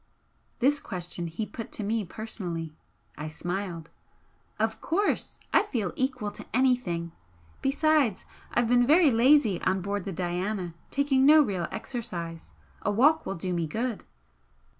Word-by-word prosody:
This 280 +4 +3
question 175 -1 -5
he 165 +7 -4
put 230 +2 -8
to 215 - -3
me 220 +2 0
personally. 175 -6 -5 0.5
I 155 - -4
smiled. 175 +1 -4 0.7
"Of 220 +1 -1
course! 400 +6 0
I - - +7
feel 230 - -2
equal 255 -5 -1
to - - -10
anything! 245 -11 +1 0.5
Besides, 285 -5 +2 0.3
I've 240 -1 +2
been 245 0 +4
very 310 0 +6
lazy 235 - +4
on 190 0 +1
board 200 0 -3
the 195 - -3
'Diana,' 180 +1 -2 0.2
taking 275 -1 +2
no 305 0 +8
real 185 -9 -2
exercise. 170 -9 -5 0.3
A - - 0
walk 280 +10 +4
will 195 - -2
do 180 +2 -3
me 170 -2 -1
good." 230 +7 -3
210 Hz, 140 wpm, -28 LUFS, 175-260 Hz, 0.7 s, no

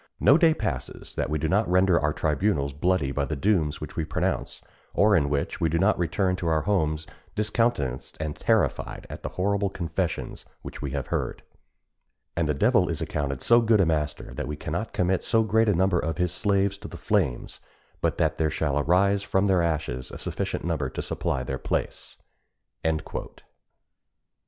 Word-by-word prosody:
No 140 - +6
day 160 -1 +5
passes 65 - -4
that - - -2
we 75 - 0
do 80 +2 -1
not 100 +3 +2
render 90 -1 +4
our 75 - +1
tribunals 75 -2 0
bloody 75 -1 +1
by 70 +1 -1
the 75 +2 -2
dooms 80 -2 +1
which 75 - -8
we 80 - -1
pronounce, 75 -2 -2 0.4
or 105 0 +5
in 70 -5 +2
which 70 -1 -2
we 80 - +3
do 85 - +1
not 95 +5 +3
return 90 +2 +1
to 85 - -3
our 80 -1 +2
homes 80 -5 0 0.3
discountenanced 105 - -1
and 75 -1 -3
terrified - - 0
at - - -7
the - - -4
horrible 100 +1 +1
confessions 85 -2 -3 0.2
which - - -8
we 70 - -3
have 70 -1 -3
heard. - - -2 0.9
And 85 -3 0
the 75 - +1
devil - - +3
is - - -2
accounted 70 -3 -3
so 120 0 +6
good 110 -2 +4
a 95 - +5
master, 75 -5 -2
that - - -4
we 75 - -3
cannot 85 +8 -4
commit 90 +1 +1
so 115 0 +3
great 110 +1 +3
a 100 - +3
number 95 0 +2
of 80 0 -2
his 90 -1 0
slaves 100 -1 +1
to - - -8
the - - -9
flames 90 - -1 0.4
but - - 0
what - - +1
there 80 -1 +2
shall 75 -2 0
arise 95 +6 +3
from 95 0 +1
their 95 -3 +3
ashes 75 -6 -2
a - - -8
sufficient - - -3
number 80 -6 -1
to - - -5
supply 65 - -2
their 65 0 -4
place." - - -3
85 Hz, 185 wpm, -26 LUFS, 75-100 Hz, 0.9 s, No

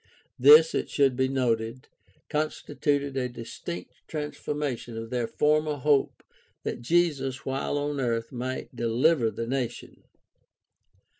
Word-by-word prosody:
This, 150 +5 +8
it - - -1
should 135 -3 +2
be 130 +1 +2
noted, 120 -2 -1 0.4
consti 150 -1 -3
tuted 140 -2 +1
a 125 -2 -1
distinct 115 -7 -7 0.2
transformation 150 -5 -4
of 115 0 -6
their 120 -2 -1
former 150 +2 +1
hope 145 0 +1 0.4
that - - -4
Jesus 135 -2 +1
while 135 +2 -1
on 145 0 -2
earth 115 -3 -1
might 130 0 -5
dehver 120 +3 +2
the 115 - -4
nation. 125 -1 -4
135 Hz, 125 wpm, -27 LUFS, 120-150 Hz, 0.4 s, This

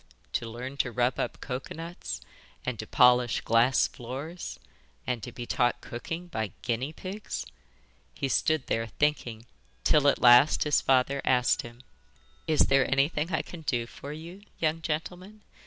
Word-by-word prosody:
To 115 - -2
learn 125 +4 -7
to 125 - 0
rub 125 +1 +1
up - - -2
cocoa 130 0 -5
nuts, 165 +2 -6 0.4
and 125 -3 -3
to 110 - -5
polish 125 -1 +4
glass 115 +3 +4
floors, 140 +9 -7 0.5
and 125 -2 -2
to - - -7
be 120 - -7
taught 120 0 +1
cooking 165 +9 -6
by 110 - -4
guinea 125 +4 -1
pigs! 195 +6 -6 0.7
He 135 - -2
stood 155 +2 +1
there 115 0 -1
thinking, 120 -3 -1 0.4
till 150 -2 +4
at 140 - +4
last 125 +4 +7
his 150 -1 +2
father 135 +1 +2
asked 125 -2 +3
him: 120 +2 -12 0.6
'Is 155 - +3
there 135 -1 +4
anything 150 +4 +1
I 155 - 0
can 175 - -10
do 120 -6 -1
for 140 +4 -9
you, 165 +6 -9 0.2
young 160 0 0
gentleman? 180 +7 -5
135 Hz, 155 wpm, -28 LUFS, 120-155 Hz, 0.7 s, last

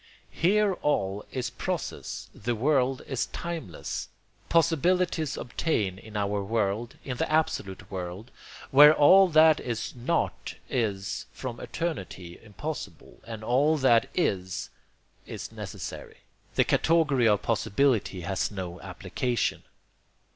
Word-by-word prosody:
Here 200 +3 +3
all 100 -8 0
is 125 -2 -3
process; - - -4
that 120 +3 -2
world 130 +1 +1
is 130 -3 -2
timeless. 165 - -5 0.4
Possibilities 165 0 +2
obtain 105 - -1
in 110 0 -8
our 100 0 0
world; 110 +2 -1
in 125 -3 -4
the - - -1
absolute 150 -11 -1
world, 95 +5 -6 0.4
where 150 +3 +9
all 190 +7 +7
that 155 -1 +6
is 120 -2 -4
NOT 130 +8 -2 0.2
is 105 -7 -2
from 125 -3 -6
eternity 95 - -5
impossible, 135 +7 -7
and 110 -2 -7
all 140 +7 +3
that 120 -5 +4
IS 95 - -1 0.6
is - - -7
necessary, - - -7 0.4
the - - +5
category 150 -7 +3
of 105 -1 +3
possibility 110 -3 +1
has 95 +2 -1
no 90 -3 -6
application. 95 +6 -2
120 Hz, 115 wpm, -27 LUFS, 100-155 Hz, 0.6 s, where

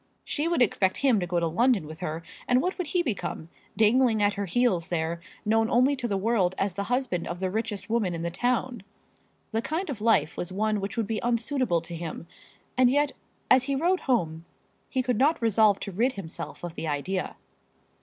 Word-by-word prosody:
She 300 +2 -1
would 335 -7 +3
expect 190 -4 +1
him 245 -6 +5
to 175 - -2
go 175 0 0
to 170 - 0
London 215 +3 +2
with 155 +2 -9
her; 165 -2 -4 0.2
and 250 0 +4
what 365 +7 -1
would 360 - -2
he 350 +4 +1
become, 200 - -3 0.3
dangling 225 +1 +4
at 205 0 +3
her 200 -1 -3
heels 185 -4 +1
there, 170 0 -1 0.3
known 225 +1 +2
only 255 +4 +4
to 240 - -2
the 200 -3 0
world 195 -3 +1
as 195 -2 0
the 200 +2 -3
husband 245 -6 -1
of 175 +1 -5
the 185 -1 -1
richest 215 -1 -3
woman 215 -6 0
in 165 - -4
the 170 - -2
town? 245 +4 -1 0.7
The 225 - 0
kind 320 +5 -2
of 225 -6 -6
life 215 -9 +2
was 175 - -4
one 210 +2 0
which 195 +4 -5
would 225 - +1
be 220 0 -2
unsuitable 235 - +1
to 170 +1 -7
him; 165 0 -6 0.5
and 250 -1 +5
yet, 290 +2 +2 0.4
as 255 0 +6
he 280 0 0
rode 355 +6 +2
home, 165 - 0 0.5
he 260 -1 0
could 250 -3 0
not 295 +5 +3
resolve 220 -3 +4
to 200 - -4
rid 235 +8 +1
himself 170 - -6
of 175 -2 -5
the 165 - -5
idea. 170 +6 -2
215 Hz, 210 wpm, -27 LUFS, 180-250 Hz, 0.7 s, as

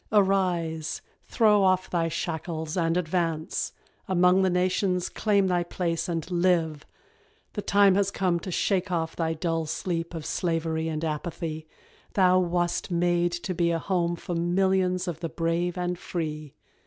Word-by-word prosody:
Arise, 180 -6 +1 0.2
throw 210 -3 +4
off 185 0 +3
thy 170 -2 0
shackles 160 -1 -3
and 165 -1 +1
advance 165 -2 -1 0.4
Among 180 0 +4
the 190 - +3
nations 180 0 +1
claim 200 -2 +2
thy 180 -2 +2
place, 170 -1 -2
and 165 +1 -3
live! 170 -4 +1 0.7
The 205 - -3
time 200 -1 +4
has 200 0 +2
come 185 -3 0
to 185 - -7
shake 185 +1 0
off 165 -2 -1
thy 165 -1 -1
dull 165 -1 -1
sleep 170 +1 -3
Of 160 -2 -6
slavery 165 -2 -1
and 160 0 -2
apathy: 155 0 -4 0.5
thou 185 -1 +5
wast 175 0 0
made 175 0 +1
to 175 +2 -3
be 170 -1 +1
A 170 - +1
home 175 -1 0
for 175 - -6
millions 185 +1 +1
of 165 -3 -4
the 165 -1 -3
brave 170 +2 -1
and 180 0 -2
free. 155 -5 -5
175 Hz, 155 wpm, -26 LUFS, 165-185 Hz, 0.7 s, thou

